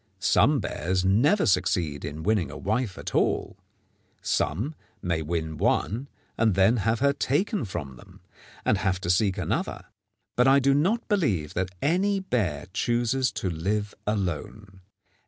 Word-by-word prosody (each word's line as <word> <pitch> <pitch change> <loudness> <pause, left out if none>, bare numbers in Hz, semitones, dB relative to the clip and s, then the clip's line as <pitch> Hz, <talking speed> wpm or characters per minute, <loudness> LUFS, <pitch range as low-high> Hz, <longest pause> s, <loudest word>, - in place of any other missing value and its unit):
Some - - +3
bears 90 +4 -1
never 130 - +3
succeed 90 -5 +1
in 75 +2 -5
winning 105 -2 +1
a - - -8
wife 110 0 -1
at - - -6
all. - - 0 0.6
Some 105 - -1 0.3
may 85 -3 0
win 80 0 -3
one 125 - 0 0.3
and 110 -4 +3
then 100 +5 +4
have 110 +2 0
her 140 0 +4
taken 145 - 0
from 70 -9 -6
them, - - -17 0.4
and 105 - +2
have 95 -1 0
to 85 - +1
seek 100 +1 +2
another; 90 - -2 0.5
but 125 +2 +4
I 135 +1 +6
do 140 0 +3
not 190 - +1
believe 110 - 0
that 95 0 -3
any 195 +6 +2
bear 100 - -1
chooses 120 +4 +1
to 95 - -2
live 100 +6 -2
alone. 100 0 -3
105 Hz, 150 wpm, -26 LUFS, 90-130 Hz, 0.6 s, I